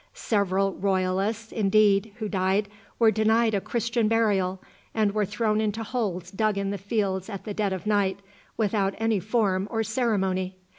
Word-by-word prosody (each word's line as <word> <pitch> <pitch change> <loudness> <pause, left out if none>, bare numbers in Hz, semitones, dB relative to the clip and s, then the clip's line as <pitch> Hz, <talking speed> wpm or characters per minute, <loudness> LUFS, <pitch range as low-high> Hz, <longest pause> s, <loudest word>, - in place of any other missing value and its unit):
Several 195 -2 0
Royalists, 195 +3 -1
indeed, 210 0 +3
who 220 -2 -4
died, 195 +1 0 0.3
were 225 -2 +5
denied 220 +1 +2
a 200 - +1
Christian 235 0 0
burial, 200 -5 +1 0.4
and 215 -2 +2
were 210 -1 0
thrown 215 +1 0
into 220 +1 -1
holes 195 -7 -3
dug 215 0 0
in 200 0 -1
the 200 - -4
fields 195 -1 -1
at 195 -3 -6
the 210 - -5
dead 205 -1 0
of 190 +1 -4
night, 200 -2 +1 0.4
without 200 -2 +1
any 225 -2 +1
form 200 -1 0
or 225 -1 -1
ceremony. 195 -6 -1
205 Hz, 160 wpm, -26 LUFS, 195-220 Hz, 0.4 s, were